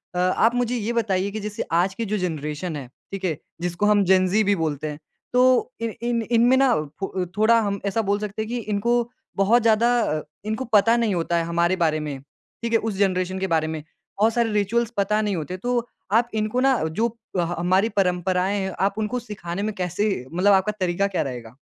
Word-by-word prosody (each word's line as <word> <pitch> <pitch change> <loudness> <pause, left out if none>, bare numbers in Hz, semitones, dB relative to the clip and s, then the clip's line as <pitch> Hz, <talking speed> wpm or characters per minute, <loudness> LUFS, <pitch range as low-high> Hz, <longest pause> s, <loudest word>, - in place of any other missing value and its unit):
अ, - - -2
आप 220 +6 +3
मुझे 245 0 0
ये 230 0 -2
बताइए 200 -4 0
कि 215 - -4
जैसे 210 0 -4 0.2
आज 185 +2 +1
की 230 - -3
जो 215 - +1
जनरेशन 160 -2 -3
है, 135 -4 -6 0.2
ठीक 195 -1 -4
है, 160 -5 -1 0.2
जिसको 175 +3 -1
हम 210 -1 +4
जेन-ज़ी 185 +3 +4
भी 205 0 +2
बोलते 155 -1 -2
हैं, 150 0 -6 0.3
तो 250 - +4 0.4
इन 230 -1 -2
इन 235 -1 0 0.2
इन - - +4
में 260 - +5
ना 270 -1 +4 0.3
फ 195 - -2
अ, 185 -1 0
थोड़ा 230 +2 +5
हम 200 -2 -2
ऐसा 200 +3 +1
बोल 205 +1 +1
सकते 210 0 -4
हैं 220 - -4
कि 245 - -2 0.2
इनको 205 +4 +1 0.4
बहुत 215 +5 +4
ज़्यादा 230 +1 +3
अ, 155 -7 -1 0.2
इनको 220 +5 -2
पता 230 +3 +4
नहीं 210 -4 +1
होता 170 0 0
है 165 - +1
हमारे 170 +2 +2
बारे 155 0 +1
में, 145 -3 -5 0.4
ठीक 235 - -2
है? 225 - +5
उस 220 -3 -3
जनरेशन 185 -1 0
के 190 - -1
बारे 155 0 +1
में। 155 - -6 0.4
बहुत 220 +2 +4
सारे 235 -1 +1
रिचुअल्स 215 +3 +1
पता 210 +2 +2
नहीं 205 -3 -1
होते 175 +3 -4
तो 245 +5 -1 0.4
आप 235 +1 +1
इनको 215 +4 -1
ना 265 -2 +4 0.2
जो 230 - +3 0.3
अ, - - +4 0.2
हमारी 185 +5 +2
परंपराएँ 185 +1 +1
हैं, 190 0 -2
आप 195 +2 +1
उनको 220 +3 -1
सिखाने 185 -2 -5
में - - -5
कैसे 180 +5 0 0.2
मतलब 195 +4 +4
आपका 190 +2 +3
तरीका 185 +2 +1
क्या - - +2
रहेगा? 120 -1 -9
200 Hz, 220 wpm, -23 LUFS, 180-220 Hz, 0.4 s, में